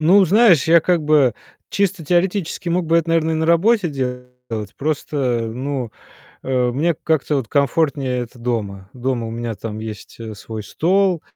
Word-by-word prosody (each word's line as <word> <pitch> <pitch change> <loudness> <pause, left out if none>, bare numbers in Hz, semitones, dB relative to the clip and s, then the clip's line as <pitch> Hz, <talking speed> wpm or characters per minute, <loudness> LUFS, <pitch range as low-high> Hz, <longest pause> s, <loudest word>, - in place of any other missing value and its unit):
Ну, 190 +6 +6
знаешь, 190 - +5
я 170 +1 +7
как 175 0 +1
бы 145 -6 +3 0.4
чисто 195 -4 0
теоретически 175 +1 0
мог 175 0 0
бы 165 +1 +3
это, 165 0 -2
наверно, 160 -1 +2
и - - 0
на 160 0 0
работе 185 +4 +3
делать. 125 -2 -4 0.5
Просто, 140 -5 -1
ну, 130 -1 -3 0.5
э, 130 -1 +1
мне 160 +6 +1
как-то 150 -1 0
вот 130 -5 -3
комфортнее 140 -2 +1
это 120 0 -8
дома. 105 -5 -4
Дома 125 -2 -2
у - - -6
меня 115 0 -4
там 105 +1 -6
есть, 110 -2 -8
э, 110 -1 -6
свой 110 +2 -7
стол, 180 - +1
145 Hz, 170 wpm, -20 LUFS, 120-170 Hz, 0.5 s, я